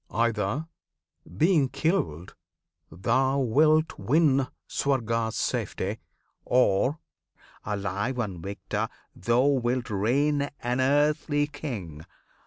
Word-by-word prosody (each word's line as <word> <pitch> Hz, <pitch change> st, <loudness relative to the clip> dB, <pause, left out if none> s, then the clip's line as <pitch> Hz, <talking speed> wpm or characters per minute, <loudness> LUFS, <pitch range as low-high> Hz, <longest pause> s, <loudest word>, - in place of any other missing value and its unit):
Either 115 Hz, +5 st, 0 dB, 0.7 s
being 155 Hz, -, +3 dB
killed 90 Hz, -, -1 dB, 0.6 s
Thou 130 Hz, -, +1 dB
wilt 155 Hz, +5 st, +3 dB
win 140 Hz, -2 st, +3 dB, 0.2 s
Swarga's 115 Hz, -5 st, 0 dB
safety, 100 Hz, +4 st, -2 dB, 0.4 s
or 125 Hz, +3 st, +2 dB, 0.7 s
alive 100 Hz, +4 st, -2 dB
And 100 Hz, -8 st, -3 dB
victor 100 Hz, +3 st, -3 dB, 0.3 s
thou 120 Hz, +7 st, +2 dB
wilt 125 Hz, -3 st, +1 dB
reign 140 Hz, +8 st, +1 dB
an 125 Hz, +1 st, -1 dB
earthly 145 Hz, +2 st, +2 dB
king. 100 Hz, -, -7 dB
125 Hz, 85 wpm, -27 LUFS, 105-145 Hz, 0.7 s, being